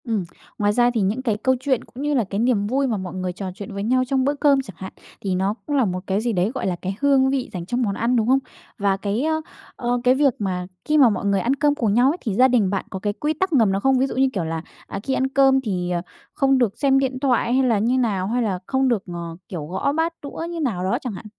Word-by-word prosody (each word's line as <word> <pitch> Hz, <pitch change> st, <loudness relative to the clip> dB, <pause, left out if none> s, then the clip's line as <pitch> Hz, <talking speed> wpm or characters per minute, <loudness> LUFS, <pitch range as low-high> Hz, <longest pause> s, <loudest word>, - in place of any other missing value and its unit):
Ừm. 225 Hz, -6 st, -1 dB, 0.3 s
Ngoài 205 Hz, 0 st, +2 dB
ra 240 Hz, +2 st, +4 dB
thì 225 Hz, -, 0 dB
những 205 Hz, +6 st, 0 dB
cái 225 Hz, -5 st, 0 dB
câu 260 Hz, +4 st, +2 dB
chuyện, 260 Hz, -2 st, 0 dB
cũng 260 Hz, +3 st, -9 dB
như 295 Hz, 0 st, 0 dB
là 250 Hz, -5 st, +2 dB
cái 200 Hz, 0 st, -4 dB
niềm 225 Hz, -4 st, +2 dB
vui 270 Hz, +4 st, +1 dB
mà 225 Hz, -4 st, -1 dB
mọi 185 Hz, -2 st, -6 dB
người 185 Hz, -1 st, -3 dB
trò 185 Hz, +1 st, -5 dB
chuyện 205 Hz, -1 st, -8 dB
với 200 Hz, 0 st, -4 dB
nhau 255 Hz, +4 st, +2 dB
trong 265 Hz, 0 st, +1 dB
bữa 285 Hz, -, +2 dB
cơm 285 Hz, -1 st, +3 dB
chẳng 195 Hz, -9 st, -11 dB
hạn, 190 Hz, -, -7 dB, 0.3 s
thì 190 Hz, -2 st, -1 dB
nó 190 Hz, +2 st, 0 dB
cũng 290 Hz, -, -2 dB
là 265 Hz, -4 st, +3 dB
một 185 Hz, -2 st, -2 dB
cái 195 Hz, +2 st, 0 dB
gì 235 Hz, 0 st, -1 dB
đấy, 185 Hz, +3 st, +1 dB
gọi -, -, -2 dB
là, 180 Hz, -, 0 dB
cái 190 Hz, +3 st, -5 dB
hương 275 Hz, -2 st, +4 dB
vị 265 Hz, -2 st, -1 dB
dành 175 Hz, -2 st, -5 dB
trong 245 Hz, +7 st, -1 dB
món 200 Hz, -5 st, 0 dB
ăn, 235 Hz, +4 st, +1 dB
đúng 225 Hz, -2 st, +1 dB
hông? 265 Hz, +2 st, +4 dB, 0.4 s
Và 200 Hz, -3 st, +1 dB
cái, 205 Hz, +5 st, -2 dB
ơ, 315 Hz, 0 st, 0 dB, 0.3 s
ờ, 245 Hz, -1 st, -1 dB
cái 250 Hz, +1 st, +4 dB
việc 275 Hz, -2 st, +3 dB
mà 180 Hz, -3 st, -2 dB, 0.2 s
khi 305 Hz, 0 st, +2 dB
mà 265 Hz, -5 st, +7 dB
mọi 200 Hz, -2 st, -2 dB
người 200 Hz, -1 st, +2 dB
ăn 245 Hz, +7 st, +1 dB
cơm 290 Hz, +1 st, +2 dB
cùng 225 Hz, -8 st, 0 dB
nhau 245 Hz, +4 st, +4 dB
ấy 335 Hz, -, -4 dB
thì 220 Hz, -, -2 dB
gia 255 Hz, +4 st, +6 dB
đình 235 Hz, -7 st, +2 dB
bạn 195 Hz, 0 st, -2 dB
có 190 Hz, -, -5 dB
cái 205 Hz, +1 st, -1 dB
quy 300 Hz, +8 st, -1 dB
tắc 365 Hz, +3 st, -1 dB
ngầm 225 Hz, -8 st, +4 dB
nào 195 Hz, +1 st, -1 dB
không? 270 Hz, +2 st, +3 dB
Ví 265 Hz, -, +2 dB
dụ -, -, -6 dB
như 265 Hz, 0 st, +3 dB
kiểu 190 Hz, -5 st, -1 dB
là, 160 Hz, 0 st, -3 dB, 0.3 s
à, -, -, -5 dB
khi 270 Hz, -, -1 dB
ăn 265 Hz, 0 st, +1 dB
cơm 270 Hz, 0 st, +4 dB
thì, 180 Hz, -7 st, -2 dB
ờ, 175 Hz, -1 st, 0 dB, 0.3 s
không 270 Hz, -1 st, +3 dB
được 240 Hz, -6 st, +1 dB
xem 270 Hz, -1 st, +3 dB
điện 260 Hz, -1 st, -1 dB
thoại, 245 Hz, -3 st, +1 dB
hay 265 Hz, +1 st, +3 dB
là 225 Hz, -4 st, +2 dB
như 240 Hz, +5 st, +1 dB
nào? 205 Hz, -7 st, 0 dB
Hay 240 Hz, +4 st, 0 dB
là 195 Hz, -5 st, -1 dB
không 265 Hz, 0 st, +1 dB
được 230 Hz, -6 st, +1 dB
ngò 170 Hz, -2 st, -6 dB
kiểu, 165 Hz, -5 st, -5 dB
gõ 185 Hz, -, -1 dB
bát 325 Hz, +3 st, 0 dB
đũa 290 Hz, +3 st, -6 dB
như 340 Hz, -1 st, -5 dB
nào 225 Hz, -, -1 dB
đó 195 Hz, +6 st, +1 dB
chẳng 245 Hz, -6 st, -4 dB
hạn? 190 Hz, -, -9 dB
235 Hz, 295 wpm, -22 LUFS, 195-265 Hz, 0.4 s, mà